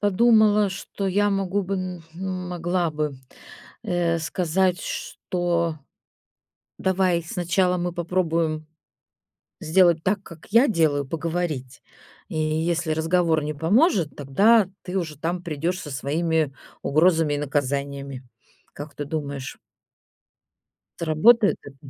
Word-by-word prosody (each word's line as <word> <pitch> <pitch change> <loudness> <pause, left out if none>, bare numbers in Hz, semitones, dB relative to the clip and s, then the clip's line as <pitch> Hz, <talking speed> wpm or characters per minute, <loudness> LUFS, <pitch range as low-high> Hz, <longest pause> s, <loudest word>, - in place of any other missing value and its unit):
подумала, 210 0 +4
что 195 +1 -5
я 205 +2 +2
могу 195 0 0
бы 195 +2 -3
м 185 -2 -5 0.5
могла 175 0 -1
бы, 150 -1 -2 0.7
э, 170 -1 0
сказать, 180 +3 0
что: 170 -3 -2 1.0
"давай 185 -2 +1
сначала 180 +2 0
мы 175 0 -2
попробуем 165 -3 -1 0.9
сделать 170 0 +3
так, 195 +2 0
как 165 -5 -13
я 230 +6 +6
делаю- 150 -8 +1
поговорить. 165 -5 -3 0.5
И 160 - -4
если 160 +1 0
разговор 160 0 +1
не 150 +1 -3
поможет, 185 - +2
тогда 195 - +4
ты 185 +1 -3
уже 155 -5 -5
там 175 +3 -2
придёшь 170 +2 -2
со 150 - -8
своими 155 +3 0 0.3
угрозами 160 0 +3
и - - -1
наказаниями". 140 -1 -2 0.5
Как 145 0 -9
ты 145 - -4
думаешь? 140 -3 -5 1.4
Сработает 200 +8 +4
это? 140 -1 -12
170 Hz, 110 wpm, -24 LUFS, 155-185 Hz, 1.4 s, я